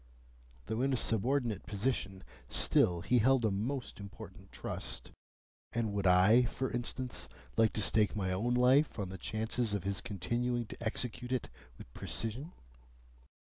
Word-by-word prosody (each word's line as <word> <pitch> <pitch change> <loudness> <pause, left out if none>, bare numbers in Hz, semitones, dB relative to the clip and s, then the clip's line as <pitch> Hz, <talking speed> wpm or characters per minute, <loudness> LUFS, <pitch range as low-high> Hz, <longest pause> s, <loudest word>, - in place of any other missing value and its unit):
Though 110 +4 -2
in 135 +1 +2
a - - +2
subordinate 115 -1 +1
position, 100 -3 -2 0.3
still 85 -1 +3
he 125 +7 +3
held 130 +1 +4
a 110 - +2
most 120 +7 -3
important 100 -1 -11
trust, - - -5 0.6
and 115 -3 -1
would 100 -2 +1
I 95 +7 +6
(for 130 0 -3
instance) 120 +1 -3 0.3
like 115 -1 +4
to 105 - 0
stake 105 -1 +3
my 95 -3 -1
own 115 +7 0
life 130 +4 +4
on 100 -4 -3
the 95 - -7
chances 110 0 -1
of 100 - -3
his 100 0 -1
continuing 120 +3 -1
to 110 - -9
execute 125 +2 -3
it 130 -2 -1 0.3
with - - -13
precision? 120 +9 -3
115 Hz, 150 wpm, -33 LUFS, 100-125 Hz, 0.6 s, I